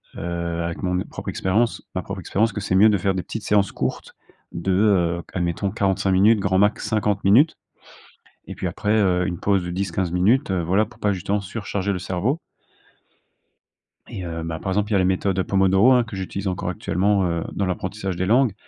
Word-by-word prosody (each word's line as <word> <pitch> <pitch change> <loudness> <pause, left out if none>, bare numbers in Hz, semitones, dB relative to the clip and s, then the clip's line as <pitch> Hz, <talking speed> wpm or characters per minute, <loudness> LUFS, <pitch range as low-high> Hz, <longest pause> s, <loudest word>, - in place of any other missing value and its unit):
heu, 85 0 -3
avec 85 0 -4
mon 90 -1 0
propre - - -10
expérience 110 +6 0
ma 95 - -2
propre 100 +3 -6
expérience 105 +5 0
que 105 - -4
c'est 95 - -1
mieux 105 +4 +7
de 105 - +2
faire 95 +1 0
des 90 - -2
petites 110 - -6
séances 100 -2 +2
courtes - - -4 0.4
de, 85 +3 -2
heu, 90 -4 +2
admettons 90 +2 -1
45 95 0 0
minutes, 105 +4 +5
grand 95 -1 +1
max 105 +2 +2
50 105 -2 0
minutes, 130 +12 +5 0.9
et - - -7
puis - - -4
après, 105 - -1
heu, 95 -4 +2
une 90 -2 -3
pause 100 -2 +1
de 90 - -4
10-15, 90 -1 -2 0.4
heu, 95 -2 0
voilà 95 +6 +2
pour 120 - -19
pas 105 - +1
justement 100 +2 -1
surcharger 100 0 -3
le 95 - -2
cerveau 95 - -1 1.7
et 95 - -7
heu, 85 -1 -5
ben, 80 0 -4
par 95 - -3
exemple, 105 +2 0
il - - -1
y - - +4
a - - +4
la 95 - +2
méthode, 95 +1 0
heu, 95 - +1
Pomodoro, 95 +5 +4
hein, 125 -2 +4
que 105 -3 -8
j'utilise 95 +1 -4
encore 90 - -3
actuellement, 100 +2 0
heu, 85 -1 -2
dans 100 - -1
l'apprentissage 95 +1 -3
des 95 - -1
langues, 120 +2 +3
95 Hz, 205 wpm, -22 LUFS, 90-105 Hz, 1.7 s, mieux